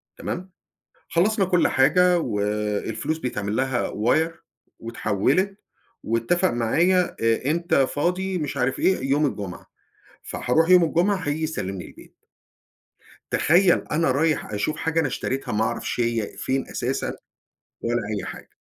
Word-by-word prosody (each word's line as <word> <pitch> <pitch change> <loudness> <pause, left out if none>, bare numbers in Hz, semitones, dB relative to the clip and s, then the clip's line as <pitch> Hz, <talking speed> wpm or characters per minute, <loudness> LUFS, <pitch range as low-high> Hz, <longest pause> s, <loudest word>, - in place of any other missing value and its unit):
تمام؟ 185 +1 -5 0.6
خلصنا 195 +4 +2
كُلّ 180 -1 +3
حاجة، 180 +6 +4
و 115 -11 -2 0.5
الفلوس 155 +8 -2
بيتعملها 125 0 -1
wire، 155 +10 +1 0.5
واتحولت، 120 - 0 0.4
واتفق 115 +12 +1
معايا، 170 +11 +2
آآ، 115 +4 +1
إمتي 170 -4 +2
فاضي 180 +6 -1
مش 150 -3 -4
عارف 130 0 0
إيه 135 -8 +1
يوم 145 +2 +3
الجمعة. 100 -9 -5 0.6
فهاروح 160 +7 0
يوم 180 -1 +7
الجمعة 175 +5 +2
هييجي 160 -4 -3
يسلمني 95 - -3
البيت. - - -16 1.2
تخيل 175 +2 +3
أنا 155 -2 +2
رايح 150 -3 0
أشوف 105 +9 -1
حاجة 160 0 0
أنا 160 - +2
اشتريتها 130 +1 -3
ما 105 +1 +1
أعرفش 110 - -3
هي 115 -3 -1
فين 130 0 -1
أساسًا - - -2 0.7
ولا 120 +1 0 0.2
أي - - -5
حاجة. - - -9
145 Hz, 130 wpm, -24 LUFS, 120-175 Hz, 1.2 s, يوم